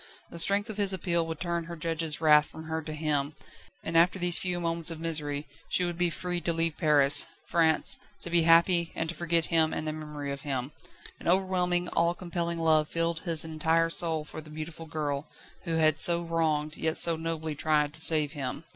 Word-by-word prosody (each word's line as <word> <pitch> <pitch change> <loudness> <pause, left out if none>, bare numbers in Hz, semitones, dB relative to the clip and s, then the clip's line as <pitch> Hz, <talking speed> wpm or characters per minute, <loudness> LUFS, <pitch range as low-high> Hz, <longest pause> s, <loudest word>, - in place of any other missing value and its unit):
The 170 - -7
strength 200 +5 +3
of 215 -2 -7
his 200 -2 +1
appeal 170 -2 0
would 160 -2 -5
turn 170 -1 -2
her 170 +1 -7
judges' 165 -1 -3
wrath 150 -2 +5
from 160 - -11
her 160 0 -4
to 155 - -8
him; 150 -2 -2 0.5
and 165 - -5
after 170 +3 +4
these 175 -1 +2
few 180 -1 -2
moments 165 -1 -1
of 165 -1 -6
misery, 150 -3 -3 0.2
she 180 - +2
would 175 -1 -5
be 175 -1 +2
free 175 +1 -3
to 170 - -1
leave 165 -1 +1
Paris, 145 -4 +4 0.2
France, 160 -2 +2 0.2
to 170 - -3
be 170 0 +4
happy, 170 +1 +4
and 165 - -3
to - - -3
forget 170 -1 0
him 160 -1 +3
and 155 - -4
the 155 - -2
memory 150 -2 -6
of 140 0 -6
him. 135 -2 -3 0.5
An - - -8
overwhelming, 180 -1 +1
all 170 +1 +1
compelling 170 -1 -3
love 155 -2 +2
filled 165 0 -1
his 165 -2 -1
entire 160 +1 0
soul 160 -3 -1
for 155 - -9
the 155 - -15
beautiful 155 +1 -8
girl, 150 -2 -3 0.4
who 165 -2 -2
had 155 -1 +2
so 170 0 +5
wronged, 155 -2 -1
yet 160 0 -1
so 170 -1 +3
nobly 160 -1 -4
tried 150 0 0
to 160 - -5
save 155 -3 +6
him. 140 0 -5
165 Hz, 210 wpm, -28 LUFS, 155-170 Hz, 0.5 s, save